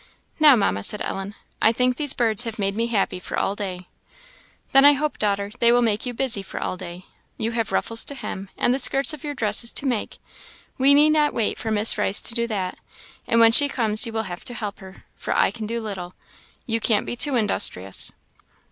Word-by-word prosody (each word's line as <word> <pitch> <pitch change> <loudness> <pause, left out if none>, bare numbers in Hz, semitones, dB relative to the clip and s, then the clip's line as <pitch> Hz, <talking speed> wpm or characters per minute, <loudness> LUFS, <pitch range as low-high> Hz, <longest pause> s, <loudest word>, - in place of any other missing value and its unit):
"Now, 300 -3 +7
Mamma," 195 - 0
said 210 - 0
Ellen, 195 +2 -6 0.3
"I 220 - +4
think 250 +2 0
these 290 0 +1
birds 225 -2 +1
have 225 -1 -6
made 200 -1 -2
me 230 +2 -1
happy 205 -5 -1
for - - -6
all 195 - -1
day." 185 -3 -6 0.9
"Then 270 - +6
I 290 +1 +8
hope, 295 +2 -3
daughter, 200 -1 -1
they 235 0 +4
will 245 0 +3
make 220 +1 -1
you 245 - -4
busy 240 -5 +1
for 195 - -8
all - - -4
day. 180 0 -10 0.3
You 225 - -3
have 230 -1 -3
ruffles 230 0 +1
to 285 - -6
hem, 195 -6 -7
and 245 - +1
the 265 - -1
skirts 275 +3 +4
of 305 - -10
your 290 -1 -5
dresses 230 0 +1
to - - +1
make 245 -5 -3 0.6
we 275 +2 +5
need 300 +1 +5
not 300 -1 +1
wait 225 -3 -1
for 225 - -4
Miss 215 0 +3
Rice 205 -1 +2
to - - +1
do 235 0 -1
that; 195 -5 -4 0.5
and 230 - +2
when 230 0 +6
she 285 +5 +6
comes, 220 -4 0
you - - -6
will 220 0 -3
have 180 -3 -8
to 245 - -4
help 210 -3 -6
her, 190 0 -14
for - - -4
I - - +2
can 220 -3 -7
do 235 +1 -3
little. 190 -5 -7 0.5
You 225 -1 -2
can't 215 -1 0
be - - -5
too 275 +2 +1
industrious." 95 - +2
225 Hz, 225 wpm, -22 LUFS, 200-250 Hz, 0.9 s, I